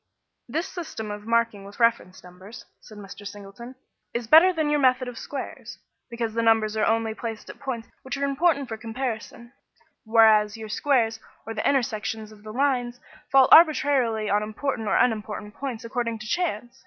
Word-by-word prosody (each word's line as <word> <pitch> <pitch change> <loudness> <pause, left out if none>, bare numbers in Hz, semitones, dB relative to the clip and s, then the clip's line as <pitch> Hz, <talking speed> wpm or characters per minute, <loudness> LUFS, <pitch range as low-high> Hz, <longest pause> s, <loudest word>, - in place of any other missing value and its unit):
"This 330 +4 -2
system 315 - -6
of 210 +1 -8
marking 230 -3 +1
with 200 +3 -13
reference 230 -6 +1
numbers," 185 +5 -12
said 215 - -14
Mr. 200 0 -10
Singleton, 205 +5 -10 0.4
"is 235 0 -2
better 325 +10 +7
than 315 -4 -1
your 295 - +2
method 255 -1 +3
of 245 - -7
squares, 275 +3 -7 0.3
because 230 -2 -3
the 230 - 0
numbers 225 -1 +2
are 215 - +1
only 225 0 +1
placed 225 -1 -6
at - - -18
points 240 -4 -5
which 260 0 -5
are 280 - 0
important 280 0 +1
for 225 - -5
comparison, 235 +1 -6 0.5
whereas 220 -2 +4
your 220 -1 -8
squares 230 -2 +1 0.3
or 225 - -5
the 220 - 0
intersections 220 -4 -2
of 210 -1 -16
the 215 0 -9
lines 245 -1 0 0.3
fall 270 -1 +6
arbitrarily 275 -9 +5
on 205 +1 +2
important 220 +2 -3
or - - +1
unimportant 210 -2 -1
points 250 -4 -6
according 230 -1 -2
to 215 - -10
chance. 245 - -3
230 Hz, 175 wpm, -25 LUFS, 215-265 Hz, 0.5 s, better